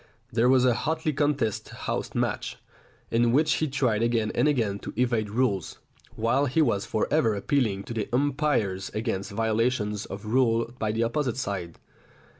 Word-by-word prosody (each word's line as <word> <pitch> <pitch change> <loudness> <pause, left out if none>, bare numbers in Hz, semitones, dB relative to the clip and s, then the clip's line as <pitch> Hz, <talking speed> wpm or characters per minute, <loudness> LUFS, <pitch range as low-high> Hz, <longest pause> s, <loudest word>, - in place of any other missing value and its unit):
There 120 +2 +3
was 130 -1 +5
a 125 - +4
hotly 155 +4 -1
contested 140 -7 -1
house - - -3
match, - - -1 0.5
in 115 0 +3
which 155 +3 +3
he 155 - 0
tried 130 -6 +1
again 115 -2 +1
and - - +2
again 110 -9 +1
to - - -7
evade 120 -4 +1
rules, 105 -5 -1 0.4
while 125 +6 +1
he 135 +6 0
was 115 -10 +2
for 110 - 0
ever 115 -9 +3
appealing 100 -2 0
to 120 - -7
the 110 -3 -3
umpires 130 -8 0
against 110 -3 -2
violations 110 -1 0
of 100 +2 -7
rule 115 0 +2
by 110 -1 0
the 115 +2 0
opposite 125 +1 -1
side. 95 -8 -4
115 Hz, 165 wpm, -26 LUFS, 105-130 Hz, 0.5 s, was